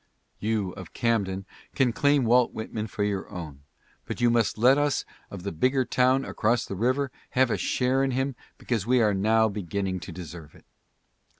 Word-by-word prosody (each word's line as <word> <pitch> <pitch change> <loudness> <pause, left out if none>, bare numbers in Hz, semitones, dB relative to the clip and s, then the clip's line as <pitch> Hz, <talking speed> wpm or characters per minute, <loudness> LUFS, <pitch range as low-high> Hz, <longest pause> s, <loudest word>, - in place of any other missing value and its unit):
You 105 -3 -1
of 95 -2 -10
Camden 100 -5 0 0.3
can 130 -4 +2
claim 145 +2 +3
Walt 120 +1 +4
Whitman 110 0 -4
for 105 - -3
your 100 -2 -2
own, 80 -8 -8 0.4
but - - -5
you 120 -1 +4
must 115 -2 +1
let 125 +5 +6
us 145 -1 0 0.2
of 95 -3 -8
the 100 - -3
bigger 130 - +1
town 130 +2 +2
across 120 +2 0
the - - -6
river 130 +6 0 0.3
have 130 -2 +4
a - - +2
share 130 +1 +1
in 135 - +1
him 130 +1 -1 0.2
because 115 -4 -2
we 125 0 +4
are 105 -3 +3
now 110 +3 +3
beginning 95 -2 -3
to 85 - -8
deserve 80 -2 -9
it. - - -19
110 Hz, 185 wpm, -26 LUFS, 95-125 Hz, 0.4 s, let